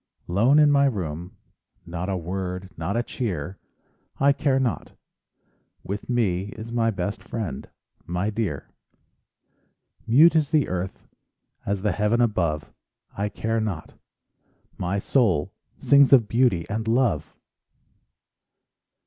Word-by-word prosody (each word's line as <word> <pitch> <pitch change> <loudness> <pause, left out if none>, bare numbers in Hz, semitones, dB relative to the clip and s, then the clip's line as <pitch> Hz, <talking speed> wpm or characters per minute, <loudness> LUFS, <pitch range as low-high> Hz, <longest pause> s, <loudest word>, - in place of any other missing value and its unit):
Lone 115 +11 +3
in 150 -1 +6
my 140 -1 +4
room, 90 - -3 0.5
Not 90 +2 -4
a 95 - 0
word, 90 +1 -5
not 85 +7 -2
a 120 - +1
cheer— 95 - -4 0.6
I 140 +1 +5
care 140 -2 +1
not—with 110 -4 -7
me 100 -7 +1
Is 110 +2 -7
my 115 -1 +2
best 100 -1 -3
friend—my 100 -2 -5
dear. 100 - -3 1.4
Mute 150 +9 +6
is 155 -3 +2
the 150 -3 +2
earth, 90 +1 -4 0.6
As 100 -1 -1
the 105 - +2
heaven 105 +5 +1
above; 85 - 0 0.4
I 100 +1 -1
care 115 +2 -2
not—my 95 0 -7
soul 100 - +1 0.2
Sings 140 -1 +5
of 120 -6 +6
beauty 115 -8 +2
and 110 0 -3
love! 115 - +1
105 Hz, 115 wpm, -24 LUFS, 90-120 Hz, 1.4 s, in